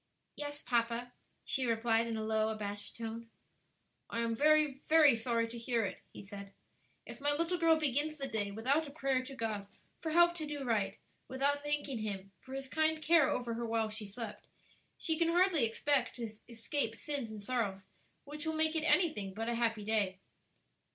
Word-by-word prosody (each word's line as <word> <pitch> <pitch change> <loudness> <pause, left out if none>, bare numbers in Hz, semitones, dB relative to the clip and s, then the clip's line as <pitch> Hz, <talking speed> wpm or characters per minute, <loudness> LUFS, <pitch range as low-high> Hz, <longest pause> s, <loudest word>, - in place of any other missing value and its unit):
"Yes, 290 0 -5
papa," 235 0 0 0.3
she 260 -2 0
replied, 230 0 +2
in 225 -1 -2
a 220 - -2
low, 220 0 +1
abashed 205 -2 -5
tone. 230 0 -6 0.8
"I 230 - -1
am 230 0 0
very, 300 0 +4
very 310 -5 +7
sorry 230 0 0
to 235 +1 -6
hear 230 -2 0
it," 190 - -6
he - - -10
said. 200 0 -9 0.5
"If - - -10
my 290 +1 +2
little 335 +4 0
girl 325 -1 +5
begins 300 +1 +1
the 275 -2 -1
day 210 -5 0
without 265 +10 +1
a - - -7
prayer 270 -3 0
to 270 +1 -9
God 215 -4 -3 0.3
for 320 - -3
help 345 +2 +5
to 310 -2 -4
do 295 -2 -4
right, 210 -5 0 0.3
without 280 +2 +1
thanking 290 -4 -2
Him 200 -2 -4
for 265 +1 -9
His 270 0 -5
kind 315 +2 +2
care 310 -2 +5
over 240 -2 -1
her 235 +1 -3
while 225 -1 0
she 215 -1 -5
slept, 210 +1 -7 0.5
she 320 -1 0
can 335 - +3
hardly 345 -6 +4
expect 255 +3 +2
to 235 -2 -4 0.2
escape 230 +1 -2
sins 280 -6 -3
and 215 -2 -8
sorrows 205 -5 -1 0.4
which 300 +1 -8
will 320 - 0
make 315 +1 +1
it 320 - +1
anything 215 - +2
but 225 +2 -2
a - - 0
happy 225 -3 0
day." 205 -4 +1
240 Hz, 190 wpm, -34 LUFS, 220-295 Hz, 0.8 s, very